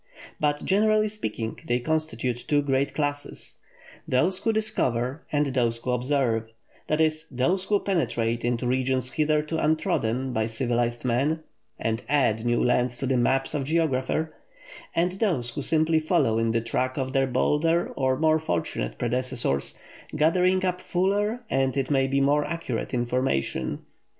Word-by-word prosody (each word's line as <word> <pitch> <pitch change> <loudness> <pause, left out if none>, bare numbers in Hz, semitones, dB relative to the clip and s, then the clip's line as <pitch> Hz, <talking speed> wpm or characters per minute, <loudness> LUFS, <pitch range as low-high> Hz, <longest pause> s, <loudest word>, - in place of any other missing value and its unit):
But, 145 -1 0
generally 215 +2 +3
speaking, 115 - -4
they 120 +1 +1
constitute 130 -4 -1
two 145 -1 +2
great 135 0 0
classes: 145 -1 -3 0.5
those 175 +9 +2
who 225 - +1
discover, 135 - 0
and 145 -2 +1
those 120 -3 +1
who 125 +2 -3
observe 125 -3 0 0.4
that 155 - 0
is, 155 0 +1
those 175 +10 0
who 205 0 +2
penetrate 120 - -1
into 120 +1 0
regions 130 0 0
hitherto 155 +1 +1
untrodden 130 -5 0
by 110 0 0
civilized 120 +1 -1
men, 140 +7 +1 0.3
and 115 +1 -1
add 130 -7 +2
new 120 0 +1
lands 125 0 +1
to 135 - -3
the 130 0 +1
maps 135 +3 +2
of 145 - 0
the - - -4
geographer; 155 -1 0 0.6
and 175 +2 +2
those 155 - 0
who 145 - -4
simply 160 +2 +3
follow 155 -9 +2
in 115 0 +1
the 115 0 +1
track 130 +3 -1
of 130 -1 -2
their 135 -1 +2
bolder 155 +6 +1
or 130 -1 0
more 155 +1 +3
fortunate 85 - -2
predecessors, 120 - -1 0.4
gathering 180 +5 +3
up 180 0 -1
fuller, 205 +6 0
and, 135 - 0
it 135 +1 -1
may 135 -1 +3
be, 135 +1 +1
more 145 +2 +3
accurate 165 -9 -3
information. 120 - -1
135 Hz, 155 wpm, -26 LUFS, 120-160 Hz, 0.6 s, generally